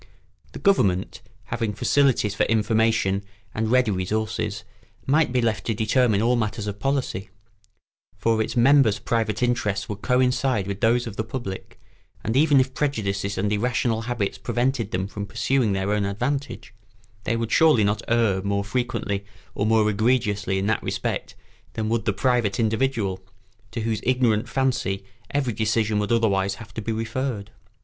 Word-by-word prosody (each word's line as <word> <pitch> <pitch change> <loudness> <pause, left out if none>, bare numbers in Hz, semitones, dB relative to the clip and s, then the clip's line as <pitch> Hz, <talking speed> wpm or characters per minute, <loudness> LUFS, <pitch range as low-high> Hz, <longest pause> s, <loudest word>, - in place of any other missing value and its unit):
The - - -7
government, 105 - +1 0.3
having 115 -3 -1
facilities 120 -2 +2
for - - -3
information 110 -3 +2 0.3
and 110 0 -1
ready 125 -2 +3
resources, 105 +2 -2 0.4
might 150 0 +3
be 125 -1 +1
left 110 -2 0
to 115 - 0
determine 110 0 +2
all 120 +2 +3
matters 110 -1 -2
of 100 -1 -5
policy; 130 -6 -2 0.9
for 115 -1 +1
its 110 - -3
members' 125 -3 +5
private 110 0 -1
interests 105 -5 0
would 105 -1 -6
coincide 125 -3 +1
with 100 0 -5
those 120 +2 +3
of 115 -3 -7
the 110 - 0
public, 110 -4 -7 0.4
and 110 - -1
even 145 0 +5
if 130 0 +1
prejudices 100 -8 -1
and 105 +2 0
irrational 115 +1 0
habits 115 -5 -2
prevented 120 +1 -1
them 95 -2 -2
from 100 0 -6
pursuing 115 +1 +1
their 95 +1 -1
own 105 -1 +1
advantage, 125 +7 -3 0.5
they 115 - +1
would 115 -1 -2
surely 155 -9 +5
not 105 +1 +1
err 115 -5 +2
more 100 +1 -1
frequently 105 -3 -2 0.3
or 105 - -1
more 110 -1 +4
egregiously 105 -2 +1
in 95 - -1
that 110 +1 +1
respect - - -3 0.4
than 110 -1 -2
would 115 -2 0
the - - +2
private 120 -1 +1
individual, 110 -4 0 0.5
to 110 +1 -4
whose 110 -1 -1
ignorant 125 -3 +1
fancy 120 -8 -1 0.2
every 135 -5 -1
decision 110 -1 +1
would 105 +1 -2
otherwise 100 -4 +2
have 110 0 -12
to 110 - -4
be 115 - -3
referred. 115 -1 -3
110 Hz, 160 wpm, -24 LUFS, 100-125 Hz, 0.9 s, members